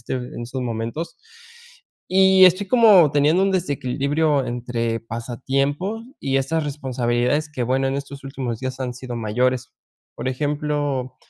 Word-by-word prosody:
este 115 Hz, -, -4 dB
en 125 Hz, -1 st, -5 dB
estos 130 Hz, +2 st, -5 dB
momentos. 115 Hz, +7 st, -4 dB, 0.9 s
Y 190 Hz, 0 st, +6 dB
estoy 185 Hz, +3 st, +2 dB
como 205 Hz, -, +6 dB
teniendo 150 Hz, +6 st, +3 dB
un 195 Hz, -, +2 dB
desequilibrio 145 Hz, -2 st, 0 dB
entre 120 Hz, -1 st, -2 dB
pasatiempos 135 Hz, -, -2 dB, 0.2 s
y 135 Hz, -1 st, 0 dB
estas 160 Hz, +4 st, -1 dB
responsabilidades, 130 Hz, 0 st, -1 dB
que 130 Hz, -5 st, -3 dB
bueno, 130 Hz, +2 st, +1 dB
en 135 Hz, -, -1 dB
estos 140 Hz, 0 st, -7 dB
últimos 130 Hz, -4 st, -4 dB
días 130 Hz, 0 st, -5 dB
han 125 Hz, -2 st, -3 dB
sido 125 Hz, -1 st, -7 dB
mayores. 125 Hz, +3 st, -1 dB, 0.4 s
Por -, -, -4 dB
ejemplo, 145 Hz, -2 st, -2 dB
135 Hz, 140 wpm, -22 LUFS, 125-150 Hz, 0.9 s, Y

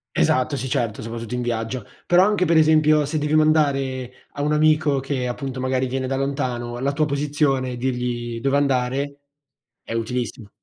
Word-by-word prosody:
Esatto, 130 Hz, -, +2 dB
sì 130 Hz, 0 st, -4 dB
certo, 120 Hz, -6 st, -1 dB
soprattutto 115 Hz, 0 st, -6 dB
in 125 Hz, -, -1 dB
viaggio. 115 Hz, -1 st, -3 dB, 0.2 s
Però, 175 Hz, +1 st, +5 dB
anche 205 Hz, -2 st, +2 dB
per 170 Hz, -1 st, +2 dB
esempio, 155 Hz, -1 st, +5 dB
se 145 Hz, +3 st, -2 dB
devi 150 Hz, 0 st, -1 dB
mandare, 135 Hz, -5 st, +1 dB
a 145 Hz, -, -3 dB
un 150 Hz, -, +1 dB
amico 155 Hz, -2 st, +3 dB
che 135 Hz, -2 st, -2 dB
appunto 130 Hz, +1 st, -4 dB
magari 130 Hz, 0 st, 0 dB
viene 130 Hz, +1 st, -2 dB
da 135 Hz, -, -1 dB
lontano, 130 Hz, -4 st, -2 dB
la 135 Hz, +3 st, 0 dB
tua 155 Hz, +1 st, +1 dB
posizione 140 Hz, -2 st, 0 dB
e 125 Hz, -, -5 dB
dirgli 120 Hz, -2 st, -2 dB
dove 135 Hz, +3 st, +1 dB
andare, 140 Hz, +1 st, 0 dB, 0.6 s
è -, -, -7 dB
utilissimo. 115 Hz, -1 st, -3 dB
135 Hz, 175 wpm, -22 LUFS, 125-150 Hz, 0.6 s, Però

